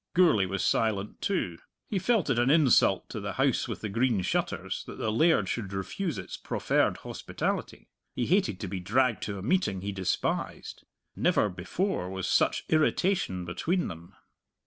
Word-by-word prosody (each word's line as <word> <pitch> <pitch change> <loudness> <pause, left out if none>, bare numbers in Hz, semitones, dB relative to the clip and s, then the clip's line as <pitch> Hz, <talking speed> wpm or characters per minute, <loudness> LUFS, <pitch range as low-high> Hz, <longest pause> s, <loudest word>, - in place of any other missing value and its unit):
Gourlay 160 - +5
was 95 +1 -2
silent 105 -2 0
too. 90 - -1 0.3
He 200 - -1
felt 195 - +2
it 120 - +2
an 120 +2 +3
insult 145 -4 +4
to - - -5
the - - -4
House - - +1
with - - -5
the 110 - -2
Green 115 -2 +1
Shutters - - -2
that - - -8
the 110 - -1
laird 115 - +3
should 100 -3 -3
refuse 130 - -3
its 95 - -6
proffered - - 0
hospitality. - - -4 0.3
He 120 - 0
hated 145 - +1
to 100 - -3
be 95 +1 -4
dragged 115 +4 +1
to 100 -1 -4
a 95 - -7
meeting 120 - +1
he 100 +1 -3
despised. 95 -2 -2 0.3
Never 105 - +2
before 90 - -2
was 95 -1 -3
such - - +2
irritation 155 - +1
between 160 - -1
them. 85 0 -10
110 Hz, 170 wpm, -28 LUFS, -, 0.3 s, Gourlay